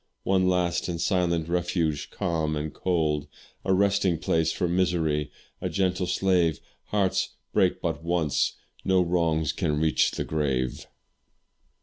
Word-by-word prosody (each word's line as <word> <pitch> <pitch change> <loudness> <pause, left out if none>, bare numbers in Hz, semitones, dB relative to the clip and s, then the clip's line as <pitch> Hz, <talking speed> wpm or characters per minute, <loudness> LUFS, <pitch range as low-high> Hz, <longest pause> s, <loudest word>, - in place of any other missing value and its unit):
One 95 -1 +2
last 90 -2 +1
and 85 -1 -3
silent 85 -4 +1
refuge, 85 -3 -1
calm 80 -3 -1
and 75 +1 -4
cold 80 -5 0 0.4
A - - 0
resting 100 -2 +3
place 80 0 +1
for 90 - -1
misery's 85 -4 +1 0.4
gentle 90 -1 0
slave; 90 -6 +2 0.3
Hearts 100 -3 0 0.2
break - - +2
but - - -2
once, 85 -4 +1 0.3
no 95 -1 +3
wrongs 85 -3 +1
can 75 0 0
reach 80 0 +3
the - - -3
grave. 65 -5 -1
85 Hz, 125 wpm, -26 LUFS, 80-90 Hz, 0.4 s, resting